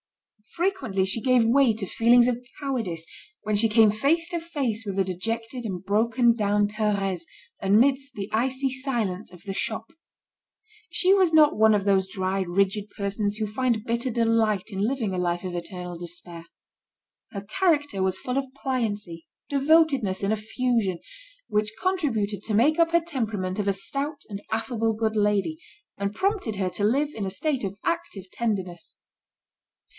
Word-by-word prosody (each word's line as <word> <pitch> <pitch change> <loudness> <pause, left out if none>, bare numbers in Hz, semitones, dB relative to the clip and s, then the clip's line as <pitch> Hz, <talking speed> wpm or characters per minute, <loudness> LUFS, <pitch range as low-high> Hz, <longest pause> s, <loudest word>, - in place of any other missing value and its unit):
Frequently, 265 - 0
she 190 +4 +1
gave 255 -2 +4
way 250 0 +4
to 215 -2 -4
feelings 235 +4 +4
of 245 0 -1 0.2
cowardice 225 - -3 0.4
when 215 0 0
she 225 +2 +4
came 215 -1 +5
face 300 +10 +1
to 345 - -1
face 275 -10 -3
with 195 -1 -4
the 195 - +3
dejected 225 +7 -4
and 190 -4 -5
broken 230 +4 +3
down 205 -2 +2
Thérèse, 205 -4 -1 0.4
amidst 260 +7 +3
the 195 -3 -4
icy 260 +4 0
silence 235 -8 -2
of 180 -2 -15
the 195 - -5
shop. 220 +3 -3 1.0
She 375 +1 +4
was 375 -4 +4
not 305 -1 +6
one 220 0 +5
of 200 -2 +1
those 190 -1 +2
dry, 190 -1 -1
rigid 195 +3 0
persons 205 +1 -2
who 215 - -1
find 225 +1 -1
bitter 235 +2 -1
delight 225 -3 +1
in 195 - -4
living 225 -3 -1
a 180 - -1
life 175 0 -1
of 180 - -4
eternal 175 0 -6
despair. 170 -1 -6 0.8
Her 200 - -5
character 290 - 0
was 190 0 0
full 250 +1 -3
of 270 -1 -2
pliancy, 205 -10 -3 0.2
devotedness, 275 -9 +2
and 200 +2 +2
effusion, 220 -3 -1 0.5
which 210 0 0
contributed 230 - -1
to 215 - -1
make 295 +9 +3
up 335 0 +4
her 340 - +5
temperament 215 - -3
of 205 - -1
a 200 - +3
stout 275 +9 -2
and 200 -1 -6
affable 225 0 0
good 220 0 -1
lady, 210 +9 +1 0.4
and 200 +1 -3
prompted 385 - 0
her 190 -2 0
to 205 - -3
live 275 +8 +2
in 215 - -5
a - - -2
state 270 +5 -2
of 195 -1 -3
active 335 - -3
tenderness. 190 -7 -3
220 Hz, 165 wpm, -25 LUFS, 195-260 Hz, 1.0 s, not